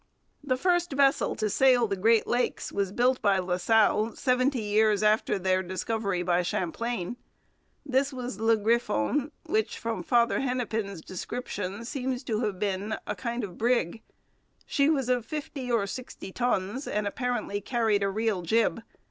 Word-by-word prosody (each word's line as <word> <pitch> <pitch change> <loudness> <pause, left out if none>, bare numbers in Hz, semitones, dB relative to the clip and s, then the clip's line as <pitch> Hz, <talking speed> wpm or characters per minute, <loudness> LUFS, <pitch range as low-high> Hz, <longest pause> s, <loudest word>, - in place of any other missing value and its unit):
The 255 -3 0
first 350 0 +1
vessel 275 0 +3
to 215 - -1
sail 250 +2 +4
the 200 - -1
Great 220 +3 +3
Lakes 245 +1 -1
was 200 -2 -1
built 250 +4 +2
by 200 -2 +3
La 180 -1 -1
Salle 220 +2 +3
seventy 255 -1 +1
years 210 0 +2
after 215 -1 +2
their 185 0 +1
discovery 190 0 -2
by 175 0 +2
Champlain. 185 +5 -3 0.7
This 275 +1 +1
was 250 -5 -6
Le 225 0 +3
Griffon, 235 - +1
which, 220 +1 -1
from 230 -4 -3
Father 235 +5 +2
Hennepin's 225 -8 -2
description, 200 +1 -5
seems 260 0 -3
to 220 -4 -1
have 210 -5 -1
been 200 +1 -2
a 210 - -2
kind 235 +5 -3
of 185 -4 -7
brig. 230 -4 +1 0.6
She 280 +1 +2
was 275 -6 +1
of 250 -2 +1
fifty 290 -3 -5
or 225 -4 +2
sixty 200 -2 -7
tons 245 +2 -1
and 210 0 -1
apparently 245 -3 -2
carried 220 -2 +1
a 200 - +1
real 215 -1 0
jib. 225 +6 +1
225 Hz, 155 wpm, -28 LUFS, 200-250 Hz, 0.7 s, sail